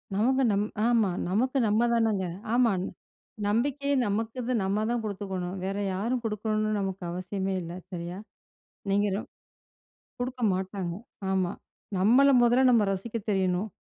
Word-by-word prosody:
நமக்கு 260 +6 +3
நம்ம 205 +1 +1 0.2
ஆமா 230 -5 +3 0.2
நமக்கு 255 +8 +1
நம்ம 215 +3 +3
தானங்க. 220 -5 +2 0.3
ஆமா. 240 -2 +4 0.8
நம்பிக்கையே 280 +6 +1
நமக்கு 225 +4 -1
நம்ம 200 +3 0
தான் 240 -1 0
குடுத்துக்கணும். 190 -3 -4
வேற 195 +1 -2 0.2
யாரும் 230 +6 -1
குடுக்கணும்னு 215 0 -1
நமக்கு 195 -1 -3
அவசியமே 190 +2 -3
இல்ல. 170 0 -6 0.2
சரியா. 175 0 -5 0.7
நீங்க 205 +1 +3
ரொம் 210 - -5 0.9
குடுக்க 255 0 -4
மாட்டாங்க. 190 -1 -3 0.4
ஆமா 185 -2 +1 0.5
நம்மள 245 +9 +5
மொதல்ல 245 +2 +5
நம்ம 230 -3 +5
ரசிக்கத் 215 +3 -4
தெரியணும். 190 +1 +1
210 Hz, 125 wpm, -28 LUFS, 190-235 Hz, 0.9 s, நம்மள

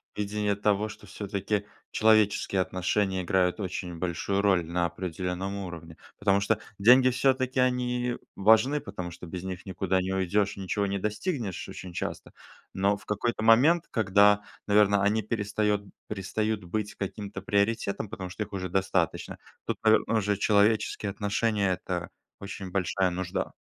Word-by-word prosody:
видение 105 0 -1
того, 105 +1 +1
что - - -11
всё-таки 100 0 -3 0.3
человеческие 105 -3 +3
отношения 95 +1 0
играют 90 +1 +1
очень 90 -3 -4
большую 95 +3 -1
роль 95 -4 +3
на 85 +1 0
определённом 90 +2 -4
уровне. 85 -4 -8 0.2
Потому 100 -1 +3
что 110 +1 +1 0.2
деньги, 125 +5 +7
всё-таки 130 0 +1
они 125 -1 +1 0.2
важны, 110 +8 +4
потому 90 -3 -6
что 85 +1 -10
без 90 +1 -6
них 95 -1 -6
никуда 95 0 0
не 95 +1 -2
уйдешь, 100 +2 +1
ничего 100 +1 -1
не 100 0 -2
достигнешь 105 - -3
очень 90 - -8
часто. - - -5 0.4
Но 100 +2 +2
в - - -18
какой-то 110 +2 -1
момент, 140 +10 +5
когда, 105 -1 +4 0.2
наверно, 100 -1 +4
они 105 +2 +2
перестает 105 -1 0 0.3
перестают 105 +1 -2
быть 105 +4 -3
каким-то 100 -1 -5
приоритетом, 100 0 0
потому 95 -4 -6
что 105 +4 -4
их 105 - -13
уже 95 -2 -3
достаточно, 95 -2 -1 0.3
тут, - - -2
наверно, 110 +1 +4
уже 105 -1 0
человеческие 105 0 +2
отношения- 105 -1 0
это - - -4 0.3
очень 100 -1 -7
большая 95 0 +1
нужда. 90 0 -3
100 Hz, 145 wpm, -28 LUFS, 95-110 Hz, 0.4 s, деньги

